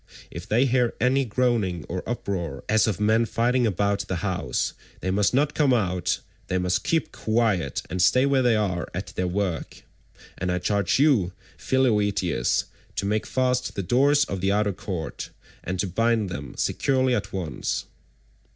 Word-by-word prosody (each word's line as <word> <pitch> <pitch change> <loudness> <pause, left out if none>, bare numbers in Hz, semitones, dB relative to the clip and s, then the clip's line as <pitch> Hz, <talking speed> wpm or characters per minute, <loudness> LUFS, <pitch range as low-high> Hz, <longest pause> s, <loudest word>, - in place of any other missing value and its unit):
If 85 +1 -8
they 120 +5 +4
hear 125 -2 +1
any 130 +3 +2
groaning 110 -8 0
or 90 +1 -3
uproar 90 - -3
as 110 +1 +3
of 105 -4 -1
men 110 +2 +3
fighting 120 +2 +2
about 100 0 0
the 95 - -2
house, 95 -2 -1 0.3
they 95 - -2
must 100 +1 +2
not 145 +3 +2
come 140 -5 +3
out; 90 -4 0 0.3
they 95 - 0
must 90 0 0
keep 165 -1 0
quiet, 110 - 0
and 90 +2 -2
stay 125 +8 +4
where 140 -1 +3
they 120 -3 +3
are 95 -6 -1
at - - -5
their 90 - 0
work. 90 -2 -3 0.6
And 90 +1 -1
I 90 - 0
charge 100 +1 +1
you, 130 - +3 0.2
Philoetius, 105 -8 +1 0.3
to - - -2
make 105 +2 0
fast 125 -1 0
the 100 - -2
doors 140 +8 +3
of 95 -2 -4
the 95 +1 +2
outer 105 0 +1
court, 90 -5 -5 0.3
and 95 +1 -3
to - - +1
bind 110 +2 +1
them 70 -6 -6
securely 130 -2 +1
at 100 -4 -2
once." 85 -9 -3
105 Hz, 170 wpm, -25 LUFS, 90-125 Hz, 0.6 s, they